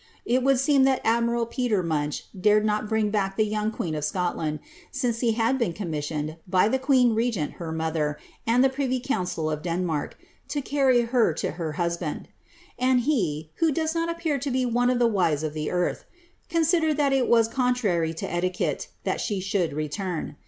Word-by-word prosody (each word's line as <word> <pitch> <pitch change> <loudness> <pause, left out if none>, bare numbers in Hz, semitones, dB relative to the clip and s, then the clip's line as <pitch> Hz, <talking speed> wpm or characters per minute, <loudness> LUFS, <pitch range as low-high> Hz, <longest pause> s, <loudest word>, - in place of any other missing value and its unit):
It 250 +2 +2
would 270 +1 +3
seem 275 0 +4
that 265 -1 +3
admiral 235 +1 +2
Peter 235 -5 0
Munch 150 -3 -2
dared 210 +2 +3
not 210 0 0
bring 220 -2 +1
back 195 -2 -1
the 215 - +3
young 215 0 -1
queen 175 -7 -3
of 150 -1 -3
Scotland, 160 -1 -1 0.3
since 245 -4 -1
he 230 -2 +2
had 235 +4 +1
been 225 -8 0
commissioned, 155 -3 -4
by 185 +2 +3
the 265 - +1
queen 255 -3 +4
regent, 220 -9 0
her 165 -1 -4
mother, 160 -2 -1 0.3
and 240 +3 +4
the 270 - +5
privy 260 -1 -1
council 180 - -2
of 155 -1 -3
Denmark, 170 -3 -2 0.3
to 290 - -2
carry 270 -3 +3
her 230 -6 +2
to - - -2
her 165 -3 -4
husband; 170 -2 -3 0.5
and 255 0 +3
he 165 - -1
(who 330 -1 +3
does 315 +2 -1
not 330 0 -1
appear 335 -4 -1
to 280 +2 -3
be 255 0 +1
one 245 +1 +2
of 250 - +2
the 240 - +3
wise 175 -9 +1
of 155 -1 -2
the 155 -1 -3
earth) 180 0 -1 0.4
considered 320 -2 +2
that 280 -2 +2
it 265 -2 +2
was 230 -1 +4
contrary 230 -10 +1
to 160 - -5
etiquette 180 +1 -1 0.2
that - - -1
she 205 -3 -1
should 185 -2 0
return. 155 +1 -4
215 Hz, 190 wpm, -25 LUFS, 170-255 Hz, 0.5 s, the